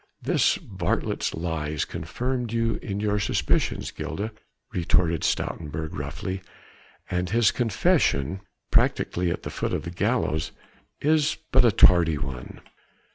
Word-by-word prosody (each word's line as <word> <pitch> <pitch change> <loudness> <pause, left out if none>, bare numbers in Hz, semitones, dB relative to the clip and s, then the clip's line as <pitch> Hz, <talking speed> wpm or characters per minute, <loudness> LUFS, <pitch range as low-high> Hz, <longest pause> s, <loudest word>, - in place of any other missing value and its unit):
"This - - +2
varlet's - - -2
lies 80 -3 -2
confirmed 120 +8 -3
you 115 0 0
in 100 -1 -3
your 105 0 +1
suspicions, 100 - 0
Gilda," 105 +3 -4 0.4
retorted 85 -1 +2
Stoutenburg 80 0 -2
roughly, 80 +7 -4 0.7
"and 90 0 0
his 115 +1 +4
confession 95 - +1 0.3
practically 90 0 +2
at - - -3
the - - -5
foot - - -2
of 75 - -1
the 85 - -5
gallows 80 -2 0 0.5
is 155 0 +2
but 130 -1 +6
a 120 - +5
tardy 85 -5 +6
one." 65 -3 -6
90 Hz, 125 wpm, -26 LUFS, 80-110 Hz, 0.7 s, but